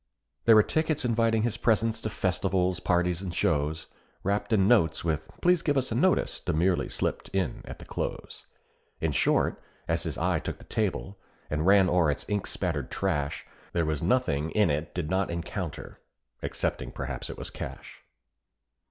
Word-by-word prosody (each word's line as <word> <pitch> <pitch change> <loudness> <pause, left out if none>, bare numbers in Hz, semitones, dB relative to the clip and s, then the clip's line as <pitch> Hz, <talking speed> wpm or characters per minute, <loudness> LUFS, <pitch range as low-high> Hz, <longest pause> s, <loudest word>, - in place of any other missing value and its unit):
There 115 - +8
were 110 - +8
tickets 155 0 0
inviting 115 -2 +2
his 115 -1 0
presence 115 -1 +2
to 110 - -2
festivals, 95 -2 0
parties, 90 0 +1
and 95 -2 -4
shows, 75 -2 0 0.4
Wrapped 100 +3 -1
in 100 -3 +4
notes 85 -9 +3
with 80 -1 -1
"Please 180 -1 +4
give 145 -4 +1
us 130 -2 +1
a - - 0
notice" 185 +10 +2
demurely 90 +2 +1
slipped - - -2
in 95 -9 -1
at - - -8
the - - -12
close; - - -5 0.5
In 80 - 0
short, 70 - +2 0.3
as 85 0 +1
his 80 -4 -3
eye - - +1
took - - -5
the - - -15
table, 100 -2 -2 0.3
and 75 +3 0
ran 100 -1 +6
o'er 90 -3 +3
its 70 - -2
ink 105 -2 -1
spattered 80 -8 -2
trash, 70 -1 -1 0.3
There 85 -2 +1
was 75 -2 -1
nothing 85 - +1
it 80 -7 +1
did 80 -4 -2
not 95 0 +1
encounter, 85 0 -5 0.4
excepting - - -2
perhaps - - -5
it - - -7
was - - -6
cash. - - -8
95 Hz, 170 wpm, -28 LUFS, 80-110 Hz, 0.5 s, There